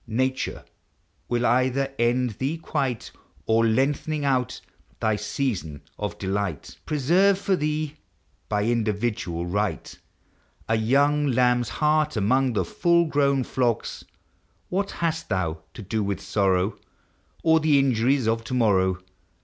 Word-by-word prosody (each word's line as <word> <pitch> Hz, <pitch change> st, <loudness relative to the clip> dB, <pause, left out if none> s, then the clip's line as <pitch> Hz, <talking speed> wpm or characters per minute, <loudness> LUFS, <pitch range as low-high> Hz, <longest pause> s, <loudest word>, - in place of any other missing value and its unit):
p 110 Hz, -, -9 dB
Nature 130 Hz, +1 st, -1 dB, 0.6 s
will 120 Hz, 0 st, +1 dB
either 130 Hz, +2 st, +1 dB
end 120 Hz, +1 st, +2 dB
thee 140 Hz, +5 st, -1 dB
quite; 130 Hz, -7 st, -3 dB, 0.3 s
Or, 115 Hz, +1 st, +3 dB
lengthening 140 Hz, +6 st, +1 dB
out 130 Hz, -3 st, 0 dB, 0.4 s
thy 110 Hz, -1 st, +1 dB
season 105 Hz, -, -3 dB, 0.2 s
of -, -, -4 dB
delight, 95 Hz, -4 st, -3 dB
Preserve 175 Hz, +7 st, +3 dB
for 195 Hz, -1 st, +1 dB
thee, 155 Hz, -1 st, -2 dB, 0.5 s
by 105 Hz, -1 st, +1 dB
individual 105 Hz, -6 st, -1 dB
right, 95 Hz, -2 st, -2 dB, 0.7 s
A 115 Hz, -, +2 dB
young 140 Hz, +6 st, +2 dB
lamb's 125 Hz, -1 st, +2 dB
heart 150 Hz, -2 st, +1 dB
among 125 Hz, +5 st, +2 dB
the 105 Hz, -, 0 dB
full 170 Hz, -5 st, +2 dB
grown 140 Hz, -3 st, +2 dB
flocks. 120 Hz, -2 st, -1 dB, 0.7 s
What 195 Hz, +2 st, -1 dB
hast 165 Hz, -1 st, -2 dB
thou 80 Hz, -4 st, -1 dB, 0.2 s
to 110 Hz, -, -8 dB
do 110 Hz, +2 st, -1 dB
with 100 Hz, -2 st, -2 dB
sorrow, 95 Hz, 0 st, 0 dB, 0.6 s
Or 160 Hz, 0 st, +5 dB
the 155 Hz, -2 st, +3 dB
injuries 130 Hz, -1 st, +2 dB
of 115 Hz, 0 st, 0 dB
to 130 Hz, -, -3 dB
morrow? 95 Hz, -6 st, +3 dB
125 Hz, 130 wpm, -25 LUFS, 105-145 Hz, 0.7 s, Or